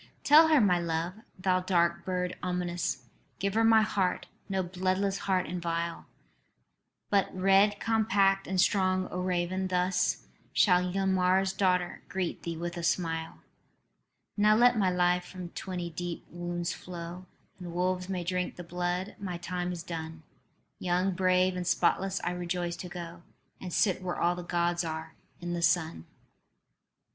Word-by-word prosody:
"Tell 310 +2 +8
her 310 -2 +5
my 185 -6 +4
love, 170 +1 -2 0.2
thou 185 0 +2
dark 170 -2 +1
bird 180 -1 -2
ominous; 175 -7 -2 0.3
Give 200 0 -1
her 225 +1 +3
my 225 -1 +6
heart, 195 -3 0 0.2
no 190 -1 0
bloodless 185 +2 -1
heart 185 -1 +2
and 175 +2 -4
vile 170 0 -3 1.0
But 200 -1 +3
red 195 +2 +4
compact 200 -3 +2
and 190 -1 -1
strong, 185 0 +2
O 180 - -3
raven. 180 +1 -1
Thus 180 0 0 0.3
Shall 180 -2 +4
Ylmer's 190 0 +2
daughter 180 -2 0
greet 185 -2 -3
thee 165 -1 -4
with 175 +1 -4
a - - -3
smile. 165 -1 -1 0.9
"Now 210 0 +4
let 245 +2 +5
my 200 -4 +2
life 180 0 +2
from 180 -2 -8
twenty 175 -1 -5
deep 175 +1 -5
wounds 175 0 -3
flow, 180 +1 -8 0.3
And 175 -2 -7
wolves 180 +1 -1
may 185 -2 -2
drink 180 +1 -2
the 175 - -8
blood. 175 +2 -3
My 185 -3 -4
time 180 +1 -3
is 170 -2 -5
done. 160 -2 -6 0.6
Young, 180 +1 +1
brave 185 0 +2
and 180 -1 -3
spotless, 195 +2 +1
I 175 - 0
rejoice 175 -1 -3
to 180 - -7
go 170 -1 -8 0.4
And 185 - -7
sit 185 +1 +2
where 180 -1 -3
all 175 +1 +3
the 180 - -6
Gods 175 0 0
are, 160 -1 -5 0.3
in 175 0 -4
the 170 - -2
sun." 160 - +1
180 Hz, 155 wpm, -29 LUFS, 175-190 Hz, 1.0 s, Tell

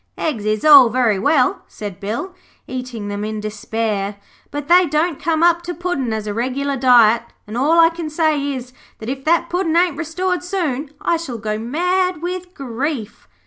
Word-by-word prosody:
'Eggs 245 -10 -2
is 215 +3 0
all 280 -5 +9
very 230 -4 +1
well,' 255 +5 +2
said 205 -3 -8
Bill, 230 - -4 0.3
eating 250 -5 -6
them 205 0 -4
in 215 0 -3
despair, 210 -1 -3 0.3
'but 290 0 -5
they 355 +1 +5
don't 305 +1 0
come 330 -1 +1
up 340 0 +4
to 350 0 -6
Puddin' 335 -8 -2
as 220 -1 -3
a 210 - -3
regular 260 +5 -2
diet, 240 -3 +5 0.2
and 215 - -8
all 300 +7 +3
I 330 0 +7
can 330 -2 -6
say 305 -2 0
is, 250 -1 -7 0.2
that 220 - -7
if 270 0 -4
that 340 +1 +2
Puddin' 350 -2 -1
ain't 345 -4 +2
restored 360 +3 -2
soon 315 -7 -2
I 340 - +1
shall 290 -8 -6
go 215 -1 -3
mad 360 +7 0
with 360 +1 -5
grief.' 260 -2 -4
280 Hz, 185 wpm, -19 LUFS, 225-335 Hz, 0.3 s, all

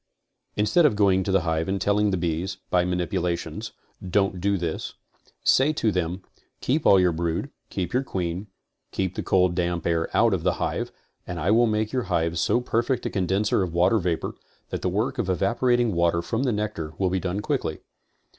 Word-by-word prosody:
Instead 105 +12 +3
of 145 -8 +4
going 100 -2 +3
to 95 - -2
the 95 -1 +3
hive 80 -1 -1
and 95 0 -1
telling 105 +1 +2
the 95 - 0
bees 85 +2 -2
(by 90 -1 +4
manip 90 -1 -1
ulations) 85 +2 -2 0.3
'don't 95 0 0
do 100 +1 +2
this"; 85 -3 -4 0.5
say 135 +4 +4
to 115 -8 0
them 90 0 -2 0.4
"keep 145 +5 0
all 100 - +7
your 90 -1 +4
brood, 85 0 -2 0.2
keep 95 +5 -3
your 130 - +3
queen, 95 -5 -3 0.4
keep 95 -1 -2
the - - -3
cold 90 -2 +2
damp 85 -1 -1
air 85 -1 0
out 115 -2 +4
of 90 - 0
the - - +1
hive - - -2 0.4
and 90 - -4
I 85 +5 +1
will 120 +2 +5
make 110 0 0
your 125 -4 0
hive 85 -1 0
so 120 - +2
perfect 125 +1 0
a - - -1
condenser 95 +2 +1
of 90 -3 -2
water 90 +6 +4
vapor 85 -3 -2 0.4
that - - -3
the - - 0
work - - -1
of - - -1
evaporating 120 +4 +2
water 85 0 +2
from 115 +6 -2
the 125 - +2
nectar 105 -7 -3
will 95 -2 +1
be 95 - +1
done 90 +2 -2
quickly." 105 - -2
95 Hz, 200 wpm, -25 LUFS, 85-105 Hz, 0.5 s, all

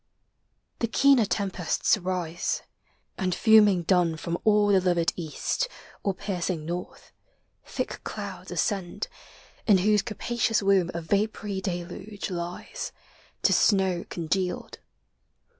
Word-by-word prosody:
The 230 - +1
keener 270 0 +5
tempests 195 -1 +1
rise; 180 -3 -2 0.6
and 185 -2 0
fuming 210 -5 +6
dun 175 -2 +2
From 170 +2 -3
all 210 -1 +4
the 195 -2 +5
livid 175 -2 +2
east, 170 - -2 0.3
or 195 -2 -1
piercing 180 -4 -3
north, 175 +2 -6 0.5
Thick - - -4
clouds - - -6
ascend; 195 - -2 0.6
in 205 -3 +7
whose 210 +2 +3
capacious 225 0 -1
womb 195 -3 +3
A 170 - -2
vapory 200 +2 -1
deluge 190 +3 -5
lies, 175 0 -5 0.5
to - - +5
snow 190 -4 +3
congealed. 180 +2 -2
190 Hz, 110 wpm, -27 LUFS, 175-210 Hz, 0.6 s, in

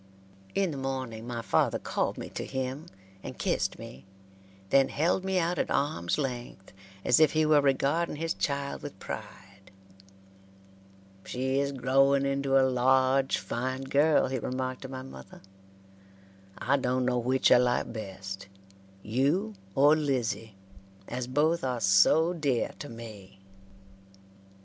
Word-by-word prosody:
In 195 -3 +1
the 140 - -5
morning 130 -4 -4
my 120 -1 -4
father - - +2
called - - -2
me - - -6
to - - -5
him 130 +4 -4 0.3
and - - -8
kissed - - -1
me, 65 - -10 0.7
then 135 -1 +5
held 170 +5 +1
me 190 0 0
out 175 -1 0
at - - 0
arms' 85 -12 0
length 120 -9 -5 0.3
as 125 - +5
if 155 - +5
he 155 0 +3
were 150 -1 +5
regarding 140 +5 +1
his 165 +2 -2
child 140 -1 -2
with 145 -8 -8
pride. 95 0 -9 1.5
"She 130 +2 -1
is 140 0 0
growing 135 +1 +3
into 140 0 +1
a 130 - +4
large 130 +1 +3
fine 130 +2 -3
girl," 145 +3 +3
he 130 0 -2
remarked 130 +2 -3
to 135 - -6
my 130 -1 -6
mother. 65 - -12 1.2
"I 140 +4 +1
dun 125 -1 0
no 125 -1 +1
which 130 +2 +2
I - - +9
like 125 -1 +1
best, 95 -2 -7 0.6
you 145 - 0 0.2
or 145 +3 +6
Lizzie, 125 -8 -2 0.5
as 125 0 -4
both 155 +5 +1
are 125 -2 -1
so 110 - +4
dear 145 -8 0
to 145 - -7
me." 110 -5 -11
130 Hz, 140 wpm, -28 LUFS, 120-145 Hz, 1.5 s, I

